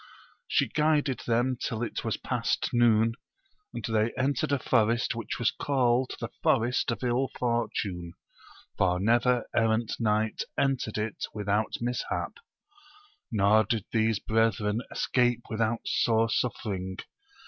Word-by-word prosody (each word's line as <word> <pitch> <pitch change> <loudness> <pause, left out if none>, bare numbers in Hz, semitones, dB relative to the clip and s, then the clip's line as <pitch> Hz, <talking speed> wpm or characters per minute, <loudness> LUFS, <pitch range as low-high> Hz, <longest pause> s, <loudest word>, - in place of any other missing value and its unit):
She - - +2
guided 150 -3 +1
them 120 +2 +1
till 115 +1 -2
it 120 - -4
was - - -1
past - - -1
noon, 115 -1 +4 0.6
and - - -5
they 110 0 +1
entered 135 +1 0
a 140 - +3
forest 115 -1 +2
which 115 0 -4
was 120 - +2
called 130 -2 +1
the - - -4
Forest 120 +2 +2
of 120 - -3
111 125 +2 +1
Fortune, 105 -8 -2 0.7
for 90 -1 +2
never 120 +4 +2
errant 115 0 +2
knight 110 -1 +1 0.2
entered 135 -6 0
it 105 0 -3
without 105 +1 0
mishap; 125 +1 -3 0.9
nor 105 0 +4
did 110 0 -2
these 110 -1 +2
brethren 110 0 +1
escape 120 -2 +1
without 110 +1 0
sore 115 -1 +2
suffering. 95 -7 -2
115 Hz, 125 wpm, -28 LUFS, 110-120 Hz, 0.9 s, noon